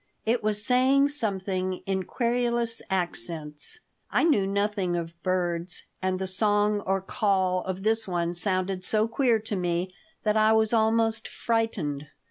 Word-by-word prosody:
It 235 +2 +1
was 210 0 0
saying 265 +3 +4
something 190 -8 -2
in 190 -1 -1
querulous 235 -1 0
accents. 165 - -1 0.3
I - - +2
knew 250 -13 +3
nothing 200 -2 0
of 170 -1 -4
birds, 175 -1 -1 0.2
and 185 0 0
the 190 - -3
song 205 +2 +2
or 195 0 +1
call 190 -2 +1
of 190 0 -4
this 220 0 +1
one 175 -2 -1
sounded 185 +1 0
so 215 +3 +2
queer 235 0 +2
to 215 -1 -3
me 180 0 -1 0.3
that 210 -1 +1
I 215 0 +4
was 220 0 +3
almost 225 0 +2
frightened. 185 -11 -2
200 Hz, 145 wpm, -26 LUFS, 185-225 Hz, 0.3 s, saying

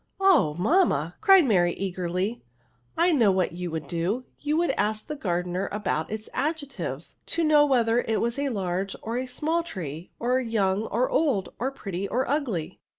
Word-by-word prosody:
" - - -46
Oh! 340 - +4
mamma/' 180 - +2
cried 385 -4 +7
Marj, 175 -7 +3
eagerlj, 185 +3 -2 0.3
" 125 -1 -38
I 345 +2 +4
know 240 -10 +4
what 185 -2 +1
you 175 +1 -5
would 160 -3 -5
do; 175 - -1 0.2
you 300 +1 0
would 345 +1 +2
ask 215 +1 -1
the 300 - -5
gardener 180 -4 -2
about 200 -6 -2
its 215 0 -5
adjectives, 300 -2 -3
to 335 - 0
know 300 -1 +5
whether 235 -3 +3
it 225 -2 -1
was 235 +3 -1
a 280 -1 0
large 195 -3 -2
or 230 +2 -3
a 255 +1 -2
small 310 +7 0
tree, 175 - -7
or 250 +2 +1
young 215 -4 0
or 245 +4 +1
old, 265 - +1
or 255 - 0
pretty 200 -8 -5
or 255 +5 -1
ugly." 250 - -2
220 Hz, 185 wpm, -26 LUFS, 180-280 Hz, 0.3 s, cried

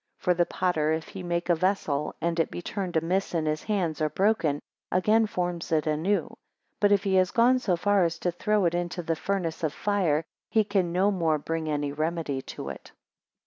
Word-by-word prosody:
For 180 -1 +2
the 175 0 +1
potter 160 -4 0
if 160 0 -3
he 190 - -7
make 175 -1 -2
a 175 - +4
vessel, 160 -5 0
and 170 0 -1
it 165 - +2
be - - -6
turned 180 -1 -3
amiss 180 +3 0
in 160 -2 0
his 155 0 -1
hands, 175 -8 -1
or 155 - +2
broken, 185 -7 +1 0.3
again 215 +5 +3
forms 175 -4 -3
it 155 -2 +2
anew; 160 +7 0 0.5
but 205 -1 +4
if 200 -1 +4
he 195 -2 0
has 185 -1 +4
gone 245 +2 +4
so 190 -8 +1
far 200 +2 +2
as 165 -1 0
to 175 - +1
throw 210 +2 +1
it 170 - +2
into 175 0 -2
the 165 0 0
furnace 180 -2 -2
of 155 -2 0
fire, 180 -7 +1 0.3
he 220 - +3
can 195 -4 0
no 190 +4 +3
more 165 -5 +1
bring 160 +1 -3
any 145 -1 -1
remedy 155 -2 -2
to - - -7
it. - - -9
175 Hz, 210 wpm, -27 LUFS, 160-195 Hz, 0.5 s, a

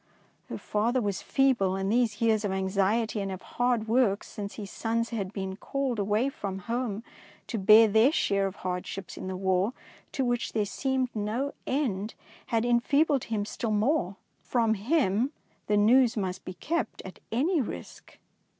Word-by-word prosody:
'^ - - -40 0.5
Her - - -4
father 230 +5 0
was 200 -5 -2
feeble, 240 -9 +2
and 195 +1 -1
these 230 -3 +1
years 220 -2 +3
of 205 - -1
anxiety 195 +4 0
and.of 190 -2 -4
hard 245 -2 0
work 220 -3 +2
since 205 -1 -7
his 205 -3 -7
sons 230 +1 -1
had 200 -5 -3
been 190 -2 -4
called 265 +1 -2
away 210 +5 +1
from 200 -7 -5
home 230 -3 -2 0.4
to 225 - -3
bear 215 +3 +8
their 220 +6 +5
share 200 - +1
of 190 - -7
hardships 180 +1 -4
in - - -6
the 185 0 -4
War 190 +4 +1 0.4
to 265 - 0
which 245 -1 -1
there 215 -2 +1
seemed 260 +3 -1
no 220 +7 -2
end, 225 -7 -1 0.3
had 230 0 +1
enfeebled 275 +4 +2
him 215 -3 -2
still 225 +2 -4
more. 210 - +1 0.3
From 230 -3 +1
him 235 - +1 0.3
the 210 - +3
news 235 +3 +5
must 190 -2 -3
be 185 - -6
kept 330 - -3
at 190 - -9
any 300 +8 +2
risk. 240 - -8
220 Hz, 170 wpm, -28 LUFS, 195-245 Hz, 0.5 s, bear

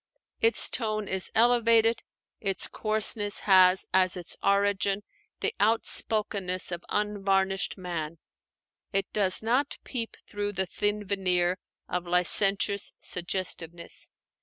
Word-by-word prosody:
Its 455 - +6
tone 215 -3 -2
is 190 0 -1
elevated; 230 -1 +3 0.4
its 195 -3 -1
coarseness 215 -1 +2
has 185 -1 +5
as 185 -1 +3
its 175 -2 -8
origin 200 0 +1 0.4
the - - 0
outspokenness 205 -3 +1
of 175 0 -5
unvarnished 195 -2 -1
man; 170 -3 -5 0.7
it 195 0 0
does 195 -1 +2
not 255 +6 0
peep 230 -4 -5
through 205 0 -4
the 190 0 -1
thin 205 +2 -2
veneer 185 -2 0 0.3
of 180 0 -4
licentious 195 +3 +2
suggestiveness. 175 -2 -4
195 Hz, 110 wpm, -27 LUFS, 185-215 Hz, 0.7 s, Its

